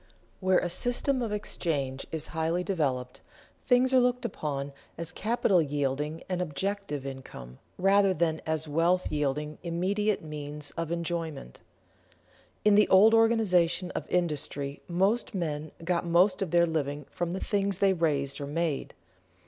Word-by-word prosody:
_Where 185 Hz, -1 st, +4 dB
a -, -, 0 dB
system 245 Hz, +8 st, +1 dB
of 230 Hz, -3 st, -2 dB
exchange 145 Hz, -10 st, -2 dB
is 160 Hz, -1 st, -3 dB
highly 165 Hz, +2 st, 0 dB
developed, 135 Hz, -10 st, -2 dB, 0.5 s
things 255 Hz, 0 st, +4 dB
are 260 Hz, -, +7 dB
looked 250 Hz, 0 st, +1 dB
upon 140 Hz, -2 st, -3 dB, 0.2 s
as 170 Hz, 0 st, -4 dB
capital 205 Hz, -3 st, +2 dB
yielding 145 Hz, +1 st, -2 dB
an 180 Hz, -1 st, -2 dB
objective 180 Hz, -2 st, -3 dB
income 130 Hz, -, -9 dB, 0.2 s
rather 195 Hz, +1 st, +4 dB
than 160 Hz, -2 st, 0 dB
as 160 Hz, 0 st, -1 dB
wealth 170 Hz, +4 st, +1 dB
yielding 150 Hz, +1 st, -2 dB
immediate 190 Hz, +5 st, 0 dB
means 150 Hz, -1 st, -6 dB
of 165 Hz, -1 st, -4 dB
enjoyment._ 165 Hz, -, -4 dB, 1.1 s
In 210 Hz, -, +6 dB
the 210 Hz, +1 st, +5 dB
old 210 Hz, +4 st, +7 dB
organization 195 Hz, -6 st, +3 dB
of -, -, -5 dB
industry 150 Hz, -5 st, -1 dB
most 195 Hz, +6 st, +1 dB
men 155 Hz, -4 st, -3 dB
got 175 Hz, -1 st, +1 dB
most 180 Hz, +3 st, +3 dB
of 190 Hz, -, -1 dB
their 170 Hz, 0 st, +4 dB
living 150 Hz, -3 st, -2 dB
from 175 Hz, 0 st, -3 dB
the 190 Hz, -, -3 dB
things 200 Hz, -2 st, 0 dB
they 195 Hz, -1 st, +3 dB
raised 145 Hz, -5 st, 0 dB
or 140 Hz, -, -4 dB
made. 160 Hz, -1 st, -2 dB
170 Hz, 145 wpm, -28 LUFS, 150-195 Hz, 1.1 s, are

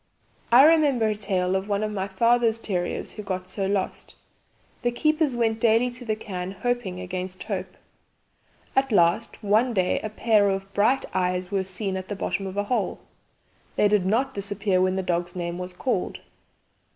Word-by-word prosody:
"I 255 Hz, +4 st, +9 dB
remember 290 Hz, -8 st, +4 dB
a 215 Hz, -, 0 dB
tale 190 Hz, -3 st, 0 dB
of 190 Hz, +2 st, -2 dB
one 205 Hz, +1 st, 0 dB
of 215 Hz, -, -2 dB
my 195 Hz, -2 st, -2 dB
father's 230 Hz, +3 st, +2 dB
terriers 180 Hz, -6 st, -3 dB
who 215 Hz, -, -7 dB
got 185 Hz, -2 st, -4 dB
so 195 Hz, +1 st, -2 dB
lost. 195 Hz, -1 st, -3 dB, 0.7 s
The 240 Hz, -, +1 dB
keepers 305 Hz, +2 st, +1 dB
went 225 Hz, -2 st, +1 dB
daily 230 Hz, +2 st, +3 dB
to 245 Hz, +1 st, -8 dB
the 220 Hz, -2 st, -1 dB
cairn 190 Hz, -3 st, -5 dB
hoping 220 Hz, -3 st, -2 dB
against 185 Hz, 0 st, -5 dB
hope. -, -, -5 dB, 1.0 s
At 270 Hz, -1 st, +2 dB
last 175 Hz, +4 st, +2 dB
one 220 Hz, +4 st, +2 dB
day 185 Hz, -2 st, +2 dB
a 215 Hz, -, -4 dB
pair 215 Hz, -2 st, +3 dB
of 195 Hz, 0 st, -3 dB
bright 230 Hz, +7 st, +2 dB
eyes 180 Hz, 0 st, -1 dB
were 195 Hz, -1 st, +1 dB
seen 190 Hz, +1 st, -3 dB
at 185 Hz, 0 st, -6 dB
the 205 Hz, -, -4 dB
bottom 195 Hz, 0 st, -2 dB
of 190 Hz, +1 st, -7 dB
a 205 Hz, -, +1 dB
hole. 245 Hz, +4 st, -1 dB, 0.8 s
They 210 Hz, -, +4 dB
did 205 Hz, -3 st, +2 dB
not 240 Hz, +7 st, +1 dB
disappear 200 Hz, -1 st, 0 dB
when 185 Hz, 0 st, +2 dB
the 190 Hz, -, -1 dB
dog's 175 Hz, 0 st, -1 dB
name 175 Hz, 0 st, -3 dB
was 180 Hz, 0 st, -5 dB
called. 190 Hz, +2 st, -2 dB
200 Hz, 180 wpm, -25 LUFS, 185-230 Hz, 1.0 s, I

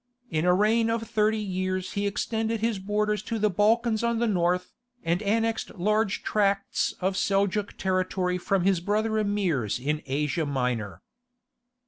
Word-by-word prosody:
In 155 Hz, 0 st, 0 dB
a 180 Hz, -, +5 dB
reign 225 Hz, +3 st, +3 dB
of 225 Hz, 0 st, 0 dB
thirty 220 Hz, -1 st, +1 dB
years 185 Hz, -2 st, -2 dB
he 200 Hz, 0 st, -1 dB
extended 220 Hz, +2 st, -1 dB
his 225 Hz, -2 st, 0 dB
borders 210 Hz, +1 st, 0 dB
to 225 Hz, +1 st, -3 dB
the 210 Hz, -1 st, +2 dB
Balkans 220 Hz, +3 st, +2 dB
on 235 Hz, 0 st, +1 dB
the 235 Hz, -, +1 dB
north, 180 Hz, -3 st, 0 dB, 0.3 s
and 170 Hz, +3 st, 0 dB
annexed 225 Hz, +3 st, 0 dB
large 210 Hz, +2 st, 0 dB
tracts 200 Hz, -1 st, 0 dB
of 190 Hz, +1 st, 0 dB
Seljouk 200 Hz, +1 st, 0 dB
territory 185 Hz, -1 st, 0 dB
from 190 Hz, 0 st, 0 dB
his 190 Hz, -2 st, +3 dB
brother 215 Hz, +4 st, 0 dB
Emirs 185 Hz, -, 0 dB
in 150 Hz, +4 st, -1 dB
Asia 150 Hz, +3 st, -1 dB
Minor. 120 Hz, -9 st, -2 dB
200 Hz, 150 wpm, -26 LUFS, 180-215 Hz, 0.3 s, a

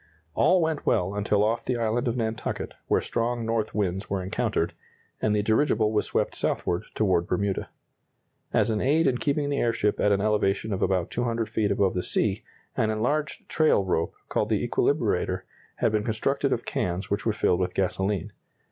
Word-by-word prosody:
All 180 Hz, -, +4 dB
went 160 Hz, -2 st, -1 dB
well 90 Hz, +2 st, +1 dB
until 105 Hz, 0 st, +1 dB
off 115 Hz, +2 st, 0 dB
the 125 Hz, -, -1 dB
island 115 Hz, +2 st, 0 dB
of 120 Hz, +1 st, 0 dB
Nantucket, 110 Hz, -1 st, -3 dB
where -, -, +2 dB
strong 120 Hz, 0 st, -1 dB
north 115 Hz, -1 st, -1 dB
winds 95 Hz, -1 st, -1 dB
were 95 Hz, -2 st, -1 dB
encountered, 95 Hz, -, -1 dB, 0.5 s
and 105 Hz, -1 st, +2 dB
the 105 Hz, -, +1 dB
dirigible 110 Hz, -1 st, +2 dB
was 105 Hz, -1 st, 0 dB
swept -, -, 0 dB
southward 90 Hz, +4 st, -1 dB
toward 95 Hz, -5 st, +2 dB
Bermuda. 100 Hz, +1 st, -1 dB, 0.8 s
As -, -, +2 dB
an 105 Hz, -, 0 dB
aid 155 Hz, +5 st, +3 dB
in 125 Hz, -3 st, +2 dB
keeping 145 Hz, -1 st, 0 dB
the 140 Hz, -, 0 dB
airship 115 Hz, -3 st, +1 dB
at 105 Hz, -, +3 dB
an 100 Hz, -, +3 dB
elevation 105 Hz, 0 st, +1 dB
of 95 Hz, -, -3 dB
about 90 Hz, -3 st, +1 dB
200 115 Hz, -2 st, -1 dB
feet 110 Hz, -1 st, 0 dB
above 100 Hz, -1 st, +2 dB
the 90 Hz, -, -1 dB
sea, 105 Hz, +4 st, 0 dB, 0.3 s
an 110 Hz, -4 st, +1 dB
enlarged 140 Hz, +7 st, -1 dB
trail 155 Hz, -11 st, +3 dB
rope, 85 Hz, -3 st, -1 dB
called -, -, 0 dB
the -, -, +1 dB
equilibrator, -, -, +1 dB, 0.3 s
had -, -, +1 dB
been 105 Hz, -1 st, +1 dB
constructed 135 Hz, +6 st, 0 dB
of 120 Hz, -, -1 dB
cans 90 Hz, +2 st, -2 dB
which 100 Hz, 0 st, 0 dB
were 115 Hz, -, +2 dB
filled 90 Hz, -4 st, +1 dB
with 90 Hz, -1 st, -1 dB
gasoline. 95 Hz, 0 st, -1 dB
110 Hz, 185 wpm, -26 LUFS, 100-120 Hz, 0.8 s, All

